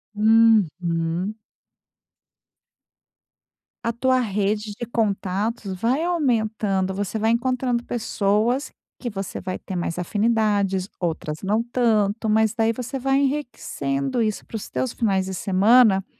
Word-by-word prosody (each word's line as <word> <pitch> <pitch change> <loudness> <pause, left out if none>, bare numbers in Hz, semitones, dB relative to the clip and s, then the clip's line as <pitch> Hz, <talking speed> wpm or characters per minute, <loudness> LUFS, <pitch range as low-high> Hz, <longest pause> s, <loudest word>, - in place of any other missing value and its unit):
Uhum. 195 -4 +2 2.5
A 230 - +1
tua 255 +2 +2
rede 210 -1 -1
de 240 - -3
contatos 205 -1 -1
vai 240 - 0
aumentando. 220 - 0
Você 205 +2 -3
vai 220 +1 +2
encontrando 245 0 0
pessoas 225 +3 0 0.3
que 245 - -3
você 195 -2 -5
vai 185 -1 -4
ter 190 - -7
mais 175 -1 -2
afinidades, 205 -1 +1
outras 160 -3 -3
não 210 +4 +1
tanto. 225 -3 +1
Mas 220 0 +3
daí, 225 0 +2
você 255 +3 -5
vai 270 +1 +1
enriquecendo 240 - -2
isso 215 -2 -1
para - - -10
os 215 - -5
teus 255 -2 -2
finais 195 -4 +1
de 190 - -5
semana 195 +2 +4
215 Hz, 120 wpm, -23 LUFS, 195-235 Hz, 2.5 s, semana